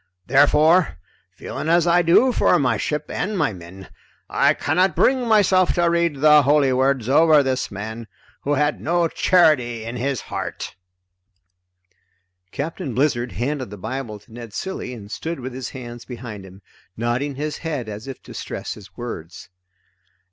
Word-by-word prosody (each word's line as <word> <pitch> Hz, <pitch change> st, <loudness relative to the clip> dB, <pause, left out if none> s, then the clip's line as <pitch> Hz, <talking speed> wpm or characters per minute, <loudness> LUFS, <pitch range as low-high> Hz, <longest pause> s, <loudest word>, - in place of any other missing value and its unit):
Therefore, 150 Hz, -, +4 dB, 0.4 s
feeling 160 Hz, -, -5 dB
as 170 Hz, 0 st, +4 dB
I 175 Hz, 0 st, +4 dB
do 175 Hz, +10 st, +4 dB
for 180 Hz, -, +3 dB
my 125 Hz, -6 st, +1 dB
ship 150 Hz, +7 st, -2 dB
and 210 Hz, 0 st, -2 dB
my 115 Hz, -, +1 dB
men, 90 Hz, +1 st, -11 dB, 0.4 s
I -, -, +3 dB
cannot 180 Hz, +4 st, +1 dB
bring 255 Hz, -2 st, +2 dB
myself 195 Hz, -4 st, +4 dB
to 175 Hz, -1 st, +2 dB
read 170 Hz, -5 st, 0 dB
the 150 Hz, 0 st, +7 dB
holy 140 Hz, -1 st, +3 dB
words 130 Hz, -2 st, +1 dB
over 150 Hz, +2 st, +5 dB
this 130 Hz, -1 st, -1 dB
man 110 Hz, +3 st, -7 dB, 0.3 s
who 145 Hz, +1 st, 0 dB
had 145 Hz, +1 st, 0 dB
no 170 Hz, +2 st, +1 dB
charity 150 Hz, -, +2 dB
in 115 Hz, +2 st, -5 dB
his 135 Hz, -1 st, -2 dB
heart." -, -, -6 dB, 1.8 s
Captain 140 Hz, -4 st, -4 dB
Blizzard 125 Hz, -3 st, 0 dB
handed 130 Hz, -1 st, -3 dB
the 105 Hz, -, -9 dB
Bible 115 Hz, +2 st, -5 dB
to 105 Hz, +2 st, -20 dB
Ned 115 Hz, -3 st, -9 dB
Cilley 190 Hz, -9 st, -5 dB
and 105 Hz, -3 st, -11 dB
stood 165 Hz, -1 st, -4 dB
with 130 Hz, 0 st, -6 dB
his 130 Hz, -1 st, -5 dB
hands 120 Hz, -2 st, -9 dB
behind 115 Hz, -6 st, -8 dB
him, 95 Hz, +1 st, -16 dB, 0.3 s
nodding 120 Hz, +5 st, -1 dB
his 150 Hz, +2 st, -4 dB
head 150 Hz, -8 st, -4 dB
as 105 Hz, +3 st, -7 dB
if 135 Hz, -, -8 dB
to -, -, -11 dB
stress -, -, -5 dB
his 105 Hz, -2 st, -15 dB
words. 90 Hz, -9 st, -7 dB
135 Hz, 160 wpm, -22 LUFS, 115-160 Hz, 1.8 s, the